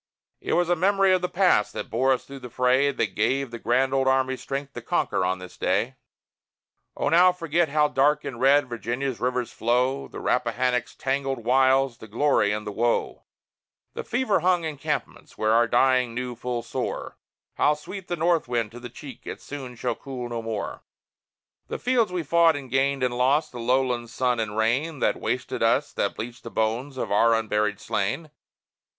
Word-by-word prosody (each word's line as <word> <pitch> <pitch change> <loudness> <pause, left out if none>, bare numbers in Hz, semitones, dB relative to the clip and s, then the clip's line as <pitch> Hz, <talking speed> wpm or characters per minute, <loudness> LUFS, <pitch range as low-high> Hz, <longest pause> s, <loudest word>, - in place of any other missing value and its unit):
It - - -3
was 175 0 +2
the 175 - +4
memory 195 +2 +3
of 185 - +2
the 180 - -1
past 180 - +2
that - - -6
bore 130 +4 +2
us 130 - 0
through 140 0 -9
the 125 -1 -9
fray, 130 +3 +2
That - - -2
gave 130 +4 0
the 120 - -7
grand 130 +4 +1
old 135 -1 +2
Army 130 0 +2
strength 140 +1 -5
to - - -6
conquer - - 0
on 95 +1 0
this 90 -1 -11
day! - - 0 1.0
O - - -1
now 180 +2 +6
forget 170 -2 0
how 150 +1 +3
dark 145 +2 +2
and 125 -3 -6
red 140 +2 +5
Virginia's 120 +3 -3
rivers 125 -1 -1
flow, 125 +4 0
The - - -9
Rappahannock's 125 0 0
tangled 135 -3 -2
wilds, 130 0 +3
the 110 - -10
glory 115 -1 +2
and 105 0 -3
the 105 - -4
woe; 120 +3 -1 0.7
The - - -5
fever 240 -5 +1
hung 175 0 +2
encampments, 150 -4 -4
where 110 0 +1
our 115 +1 +4
dying 125 -2 +2
knew 125 0 -3
full 120 0 -3
sore - - -4 0.4
How 150 - +3
sweet 185 +5 -9
the 175 - -2
north 170 -2 +1
wind 115 -3 -1
to 120 - -10
the 120 0 -8
cheek 125 +1 -11
it - - -6
soon 135 -4 -8
shall 120 +1 -2
cool 125 0 -7
no 120 -1 -3
more; 110 -2 -4 0.9
The - - -4
fields 240 -5 +1
we 180 -2 -2
fought, 165 +1 +4
and 135 -4 -7
gained, 135 0 +1
and 125 -1 0
lost; 135 +5 +2
the 120 - -8
lowland 125 -1 0
sun 125 0 0
and 110 -1 -3
rain 130 +8 +1
That - - 0
wasted - - -2
us, - - +2
that - - -1
bleached 120 +2 -7
the 115 - -8
bones 115 +5 -2
of - - -3
our 115 +3 +4
unburied 105 -2 0
slain! 105 +9 -2
130 Hz, 190 wpm, -25 LUFS, 120-145 Hz, 1.0 s, now